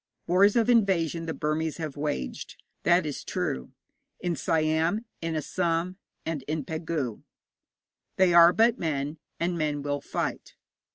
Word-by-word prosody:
Wars 195 +4 +4
of 230 -2 +3
invasion 180 -8 +2
the 160 - -2
Burmese 155 +1 -1
have 155 -4 -5
waged, 105 - -4 0.3
that 175 -1 +4
is 145 -2 -4
true, 65 -1 -3 0.5
in 175 -1 -1
Siam, 160 - +1 0.2
in 165 -1 -2
Assam, 170 +3 -1 0.3
and 160 -4 -2
in 155 -2 -2
Pegu. 160 -7 -3 0.9
They 185 -2 +4
are 170 0 +9
but 230 +4 +3
men, 150 -1 -2 0.2
and 170 0 -1
men 150 -2 -1
will 145 0 -2
fight. - - -4
165 Hz, 135 wpm, -27 LUFS, 150-175 Hz, 0.9 s, are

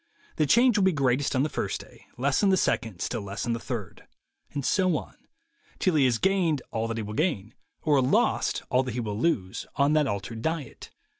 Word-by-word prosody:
The 155 - +2
change 235 - +5
will - - +3
be 190 - +3
greatest 135 -1 +1
on 130 - +3
the - - +1
first - - -3
day, - - -15
less 135 +2 +1
on 200 - +4
the 190 - +4
second, 110 - -1
still 115 - -2
less 100 +1 -5
on 120 - 0
the 115 - -3
third; 115 -8 -6 0.4
and 140 -2 -4
so 185 -5 +2
on, - - -8 0.6
till 185 - +1
he 145 -4 +4
has 125 -3 +2
gained 175 -5 +1
all 115 0 -1
that 115 0 -3
he 110 - -2
will 105 +1 -6
gain, 115 - -1 0.3
or 145 -4 +3
lost 130 - +1
all 130 - +4
that 130 -3 -4
he - - -1
will 105 -3 -3
lose, 105 - -1
on 140 +1 +3
that 155 -2 +3
altered 110 +1 -4
diet. 160 -2 -4
135 Hz, 220 wpm, -27 LUFS, 115-160 Hz, 0.6 s, change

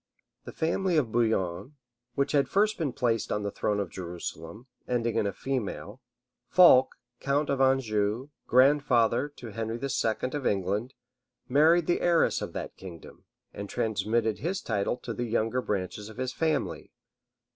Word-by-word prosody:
The - - -7
family 175 +2 0
of 125 -7 +1
Bouillon, 110 0 0 0.4
which 140 - 0
had 140 -2 +2
first 210 +1 +2
been 150 -5 -1
placed 115 -3 -1
on 105 - -1
the 100 - -2
throne 105 +1 -1
of 100 -4 -3
Jerusalem, 90 +3 -7 0.2
ending 120 -2 -1
in 100 - +1
a - - -1
female, 125 -1 -4 0.5
Fulk, 150 -8 +6 0.2
count 145 +1 0
of 135 -1 0
Anjou, 120 -2 +1 0.2
grandfather 130 -1 +3
to 120 - -9
Henry 115 +2 -4
II. 125 -2 -1
of 145 -3 -1
England, 100 +6 -1 0.5
married 155 +5 +4
the 175 - 0
heiress 170 -2 +2
of - - -5
that - - -6
kingdom, 90 -4 -12 0.3
and 100 0 -7
transmitted 110 -1 0
his 180 +6 -2
title 105 +2 -1
to 120 - -6
the 120 - -3
younger 115 +2 0
branches 105 0 -4
of 110 - -13
his 130 0 -3
family. 160 -1 -1
120 Hz, 155 wpm, -28 LUFS, 105-140 Hz, 0.5 s, Fulk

